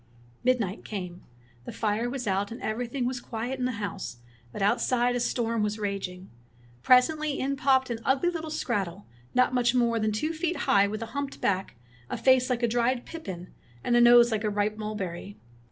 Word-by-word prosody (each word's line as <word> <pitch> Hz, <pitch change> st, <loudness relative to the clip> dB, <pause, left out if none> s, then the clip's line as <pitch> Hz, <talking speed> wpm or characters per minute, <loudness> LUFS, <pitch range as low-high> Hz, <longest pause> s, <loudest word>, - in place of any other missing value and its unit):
Midnight 230 Hz, -6 st, 0 dB
came. 180 Hz, -4 st, -6 dB, 0.4 s
The -, -, -6 dB
fire 220 Hz, +2 st, -1 dB
was 255 Hz, -1 st, -4 dB
out, 200 Hz, +1 st, 0 dB
and 230 Hz, -, -7 dB
everything 245 Hz, +3 st, -2 dB
was 255 Hz, 0 st, -2 dB
quiet 240 Hz, +4 st, -4 dB
in 250 Hz, -, 0 dB
the 255 Hz, -, -1 dB
house, 200 Hz, -, -5 dB, 0.3 s
but 195 Hz, -, -4 dB
out 200 Hz, -, +2 dB
side 245 Hz, -1 st, +2 dB
a -, -, 0 dB
storm 230 Hz, -2 st, 0 dB
was 210 Hz, 0 st, -1 dB
raging. 195 Hz, -3 st, -4 dB, 0.5 s
Presently 290 Hz, -, +3 dB
in 275 Hz, +1 st, -1 dB
popped 265 Hz, -2 st, +2 dB
an 230 Hz, -, -3 dB
ugly 270 Hz, +8 st, +2 dB
little 320 Hz, -2 st, -5 dB
skrattel 205 Hz, -, -2 dB, 0.3 s
not 255 Hz, 0 st, +3 dB
much 245 Hz, 0 st, +2 dB
more 235 Hz, -2 st, +2 dB
than 215 Hz, 0 st, +1 dB
two 305 Hz, +10 st, -1 dB
feet 335 Hz, +2 st, -1 dB
high, 200 Hz, 0 st, +4 dB
with 215 Hz, +2 st, -4 dB
a 225 Hz, -, -10 dB
humped 280 Hz, -1 st, -4 dB
back, 190 Hz, -1 st, -1 dB, 0.3 s
a -, -, -3 dB
face 260 Hz, -1 st, +4 dB
like 245 Hz, -1 st, -1 dB
a -, -, +4 dB
dried 240 Hz, +2 st, 0 dB
pippin, 185 Hz, -, -8 dB, 0.3 s
and 240 Hz, -, +2 dB
a 240 Hz, -, +6 dB
nose 240 Hz, 0 st, +7 dB
like 220 Hz, -1 st, -1 dB
a 210 Hz, -, +1 dB
ripe 205 Hz, +1 st, 0 dB
mulberry. 205 Hz, -3 st, -5 dB
235 Hz, 195 wpm, -27 LUFS, 205-255 Hz, 0.5 s, nose